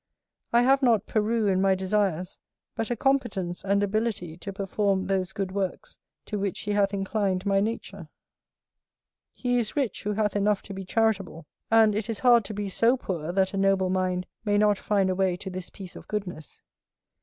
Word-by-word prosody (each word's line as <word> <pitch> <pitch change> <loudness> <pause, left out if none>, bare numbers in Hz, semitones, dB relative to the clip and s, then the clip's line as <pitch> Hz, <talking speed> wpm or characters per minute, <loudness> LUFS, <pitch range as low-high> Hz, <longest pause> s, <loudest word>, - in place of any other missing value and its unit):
I 235 +1 +5
have 270 +2 +4
not 230 -5 +3
Peru 220 +1 0
in 190 -2 +2
my 195 -1 +4
desires, 190 -2 -1 0.4
but 225 - -2
a 240 - 0
competence 235 -10 0
and 200 +1 +2
ability 205 -5 -1
to 195 +3 -6
perform 195 0 0
those 190 -1 -1
good 195 -1 -3
works 195 -1 -4 0.3
to 210 - -3
which 195 -2 -2
he 210 - -3
hath 200 -1 +2
inclined 195 -1 -1
my 195 -1 +3
nature. 200 -5 -4 1.2
He 245 -1 0
is 225 -3 -2
rich 275 -6 -1
who 210 - -2
hath 210 -1 0
enough 205 0 +1
to 200 - -8
be 190 0 -6
charitable; 195 -6 0 0.2
and 220 -1 +5
it 215 +2 -2
is 225 - -3
hard 240 -4 +5
to 215 - -5
be 205 0 -3
so 230 +6 +3
poor 170 -8 -4
that 190 +1 +1
a - - -2
noble 195 -1 +2
mind 185 -1 0 0.2
may 205 -2 +2
not 210 -1 +3
find 200 -2 +1
a 185 - +1
way 185 -1 +1
to 190 +1 -7
this 185 -1 -6
piece 190 -3 -9
of - - -11
goodness. 180 -8 -6
200 Hz, 190 wpm, -26 LUFS, 190-215 Hz, 1.2 s, I